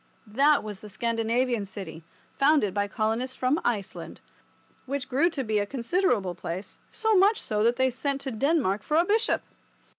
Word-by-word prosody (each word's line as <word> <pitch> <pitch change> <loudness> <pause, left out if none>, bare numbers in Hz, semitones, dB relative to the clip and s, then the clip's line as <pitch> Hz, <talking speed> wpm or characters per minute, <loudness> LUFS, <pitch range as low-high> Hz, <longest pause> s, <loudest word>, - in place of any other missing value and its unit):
That 280 +7 +3
was 210 -2 -7
the 210 - -11
Scandinavian 230 0 0
city, 175 -5 -8 0.3
founded 275 -9 +3
by 205 0 0
colonists 225 +5 -2
from 260 +5 0
Iceland, 210 -5 -3 0.7
which 275 0 -3
grew 285 +7 +2
to 285 -6 -3
be 215 -3 0
a 205 - -1
considerable 240 - 0
place, 180 +2 -7
so 440 -1 +1
much 400 +3 +4
so 210 -1 -1
that 235 +2 +3
they 260 0 +2
sent 275 +2 -2
to 270 - -4
Denmark 225 - +1
for 300 +8 0
a 340 - +4
bishop. 440 +4 +1
240 Hz, 170 wpm, -27 LUFS, 210-285 Hz, 0.7 s, much